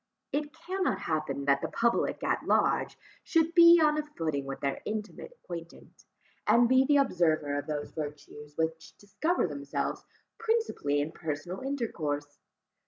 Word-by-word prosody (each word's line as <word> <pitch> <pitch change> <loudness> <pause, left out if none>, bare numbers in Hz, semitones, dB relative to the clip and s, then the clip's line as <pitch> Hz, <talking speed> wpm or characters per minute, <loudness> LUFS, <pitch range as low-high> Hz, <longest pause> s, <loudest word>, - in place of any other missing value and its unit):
It 295 +1 -2
cannot 360 - -2
happen 155 -5 -2
that 140 0 +3
the - - -1
public 235 0 0
at - - -1
large - - +2 0.3
should 330 -1 +2
be 340 -1 +9
on 305 -1 +3
a - - -1
footing 150 -4 -1
with 135 - -5
their 140 -1 -2
intimate 215 - -5
acquaintance, 170 - -10 0.4
and 235 0 +5
be 260 +2 +5
the 290 +2 +4
observer 160 - +2
of 145 - -7
those 145 -1 -3
virtues 150 -1 -8
which 160 0 -3
discover 315 - -1
themselves 140 -4 -3 0.4
principally 445 - 0
in 150 +2 -3
personal 160 +4 -5
intercourse. 155 - -3
170 Hz, 145 wpm, -29 LUFS, -, 0.4 s, be